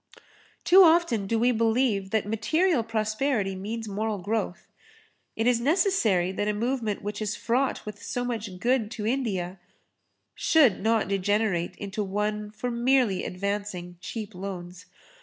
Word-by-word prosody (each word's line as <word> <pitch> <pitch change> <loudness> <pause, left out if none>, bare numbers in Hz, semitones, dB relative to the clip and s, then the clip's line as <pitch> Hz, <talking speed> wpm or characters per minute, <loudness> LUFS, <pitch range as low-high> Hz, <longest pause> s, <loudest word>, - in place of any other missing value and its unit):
Too 370 +3 +7
often 325 - +4
do 230 - +1
we 240 +2 +3
believe 225 -3 +1
that 220 0 0
material 280 - +1
prosperity 220 -1 -1
means 220 +4 -5
moral 210 +1 -2
growth. 200 -1 -3 0.7
It 225 - -1
is 240 -1 +3
necessary 255 - +2
that 205 +2 -2
a 210 - 0
movement 230 -2 -2
which 205 +1 -4
is 210 -1 -2
fraught 255 +2 -1
with 210 -1 -8
so 245 0 -3
much 215 -6 -4
good 240 0 +1
to 220 -2 -5
India 200 -7 -2 0.7
should 280 - +3
not 220 0 +2
degenerate 195 -2 0
into 205 +1 -4
one 210 +2 -2
for 220 +4 -4
merely 240 -4 +2
advancing 185 -2 -4
cheap 215 +1 -6
loans. 180 -1 -7
215 Hz, 140 wpm, -26 LUFS, 195-240 Hz, 0.7 s, Too